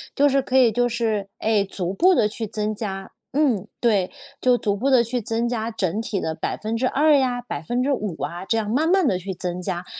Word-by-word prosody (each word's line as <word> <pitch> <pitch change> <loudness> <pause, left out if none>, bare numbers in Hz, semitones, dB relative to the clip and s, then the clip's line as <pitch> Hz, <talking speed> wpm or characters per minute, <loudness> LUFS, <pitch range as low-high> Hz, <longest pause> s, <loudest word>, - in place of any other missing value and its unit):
就 285 0 +4
是 275 0 +2
可 260 - -4
以 250 -3 +6
就 245 +3 +1
是， 220 -4 -1
哎， 215 -2 +2
逐 190 -1 -4
步 365 - +4
地 210 - +3
去 220 +1 -4
增 215 +1 -3
加， 195 -3 -5 0.2
嗯， 260 -9 +1
对， 205 -6 +2 0.3
就 250 -1 +4
逐 205 -3 0
步 260 +7 0
地 255 -3 +6
去 240 +1 -2
增 230 +2 -1
加 230 -1 -2
整 205 0 -1
体 210 -3 -2
的 160 -2 -3
2% 255 - +1
呀、 250 -2 0
5% 240 - -2
啊， 175 +4 -4
这 225 - +1
样 215 -2 -1
慢 295 +9 +1
慢 375 -4 +4
地 185 - +2
去 190 +1 -5
增 180 0 -3
加。 180 -1 -3
225 Hz, 210 characters per minute, -23 LUFS, 195-250 Hz, 0.3 s, 以